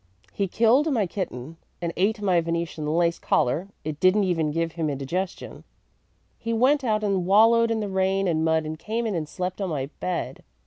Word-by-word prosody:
He 200 Hz, -, -1 dB
killed 240 Hz, -, +3 dB
my 225 Hz, -7 st, +1 dB
kitten, 165 Hz, -5 st, -5 dB, 0.2 s
and 170 Hz, -1 st, -3 dB
ate 210 Hz, +3 st, 0 dB
my 180 Hz, -4 st, +3 dB
Venetian 165 Hz, -2 st, -3 dB
lace 170 Hz, +2 st, +1 dB
collar 160 Hz, +10 st, +1 dB, 0.2 s
it 150 Hz, -1 st, -5 dB
didn't 185 Hz, +3 st, +4 dB
even 165 Hz, -5 st, 0 dB
give 165 Hz, +2 st, -1 dB
him 160 Hz, -2 st, -2 dB
indigestion. 155 Hz, +7 st, -4 dB, 0.8 s
He 230 Hz, 0 st, -3 dB
went 265 Hz, +5 st, +3 dB
out 215 Hz, -3 st, 0 dB
and 195 Hz, -4 st, 0 dB
wallowed 230 Hz, +3 st, +5 dB
in 225 Hz, -1 st, 0 dB
the 210 Hz, -, -2 dB
rain 190 Hz, 0 st, +1 dB
and 160 Hz, -2 st, +1 dB
mud 160 Hz, -1 st, +2 dB
and 155 Hz, 0 st, -5 dB
came 230 Hz, +2 st, -3 dB
in 220 Hz, -, -1 dB
and 160 Hz, -4 st, -3 dB
slept 185 Hz, +2 st, -4 dB
on 190 Hz, -, -1 dB
my 140 Hz, -3 st, -3 dB
bed. 180 Hz, -1 st, -3 dB
185 Hz, 190 wpm, -25 LUFS, 165-210 Hz, 0.8 s, wallowed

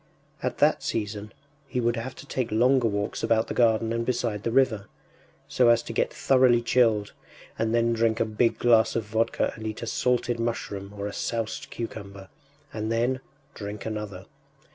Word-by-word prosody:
At -, -, -2 dB
that -, -, +3 dB
season 105 Hz, -1 st, -3 dB, 0.4 s
he 125 Hz, -, -2 dB
would 120 Hz, -1 st, +1 dB
have 125 Hz, +2 st, -5 dB
to -, -, -11 dB
take 125 Hz, -4 st, -3 dB
longer 125 Hz, +2 st, +4 dB
walks 100 Hz, -1 st, -2 dB
about 110 Hz, 0 st, +1 dB
the -, -, -2 dB
garden 115 Hz, -1 st, +2 dB
and 115 Hz, 0 st, -1 dB
beside 115 Hz, -4 st, -1 dB
the 115 Hz, -, -2 dB
river, 115 Hz, -5 st, +2 dB, 0.6 s
so 125 Hz, -2 st, +3 dB
as 120 Hz, 0 st, +4 dB
to -, -, -6 dB
get -, -, +1 dB
thoroughly 130 Hz, -3 st, +4 dB
chilled, 115 Hz, -4 st, +2 dB, 0.5 s
and 110 Hz, 0 st, +1 dB
then 115 Hz, 0 st, +2 dB
drink 115 Hz, -1 st, +1 dB
a -, -, +2 dB
big 110 Hz, +1 st, +1 dB
glass 115 Hz, -2 st, +4 dB
of 115 Hz, -, 0 dB
vodka 110 Hz, +2 st, 0 dB
and 110 Hz, -1 st, -6 dB
eat 110 Hz, +2 st, -5 dB
a -, -, -2 dB
salted 120 Hz, 0 st, 0 dB
mushroom 100 Hz, -4 st, -3 dB
or 100 Hz, -, -4 dB
a 105 Hz, -, -4 dB
soused 115 Hz, -2 st, -3 dB
cucumber, 100 Hz, -4 st, -7 dB, 0.4 s
and 110 Hz, 0 st, -3 dB
then 120 Hz, +3 st, +1 dB, 0.3 s
drink 105 Hz, -2 st, -7 dB
another.... 105 Hz, -4 st, -5 dB
115 Hz, 180 wpm, -26 LUFS, 105-120 Hz, 0.6 s, longer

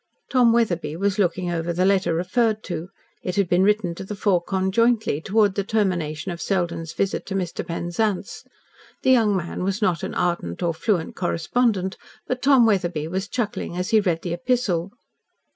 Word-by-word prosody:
Tom 250 Hz, -3 st, +5 dB
Wetherbee 175 Hz, -10 st, +1 dB
was 200 Hz, +3 st, 0 dB
looking 180 Hz, -2 st, +1 dB
over 170 Hz, 0 st, -1 dB
the 180 Hz, +2 st, +1 dB
letter 195 Hz, -2 st, +2 dB
referred 215 Hz, +5 st, +1 dB
to. 175 Hz, 0 st, -5 dB, 0.3 s
It 180 Hz, -, -3 dB
had 200 Hz, -2 st, +2 dB
been 175 Hz, +1 st, +3 dB
written 205 Hz, -3 st, +2 dB
to 170 Hz, -, -7 dB
the 205 Hz, +2 st, -6 dB
four 195 Hz, -3 st, +2 dB
conjointly, 195 Hz, 0 st, +1 dB
towards 205 Hz, +2 st, +2 dB
the 200 Hz, -, -1 dB
termination 185 Hz, -6 st, -1 dB
of 170 Hz, -, -6 dB
Selden's 170 Hz, -4 st, -1 dB
visit 195 Hz, -, -1 dB
to 195 Hz, -, -3 dB
Mr. 180 Hz, -3 st, -2 dB
Penzance. 180 Hz, +4 st, -2 dB, 0.6 s
The 260 Hz, -, +4 dB
young 220 Hz, -6 st, +4 dB
man 175 Hz, 0 st, -4 dB
was 195 Hz, +2 st, -1 dB
not 185 Hz, -6 st, +1 dB
an -, -, -5 dB
ardent 170 Hz, -, -1 dB
or 170 Hz, -1 st, +1 dB
fluent 170 Hz, 0 st, -1 dB
correspondent; 190 Hz, +3 st, 0 dB, 0.3 s
but 255 Hz, 0 st, -3 dB
Tom 270 Hz, -4 st, +5 dB
Wetherbee 175 Hz, -7 st, +1 dB
was 190 Hz, +3 st, -2 dB
chuckling 210 Hz, -6 st, -3 dB
as 180 Hz, +4 st, -2 dB
he 220 Hz, -, +6 dB
read 175 Hz, -5 st, 0 dB
the 175 Hz, -, -2 dB
epistle. 195 Hz, -5 st, 0 dB
190 Hz, 175 wpm, -23 LUFS, 175-215 Hz, 0.6 s, he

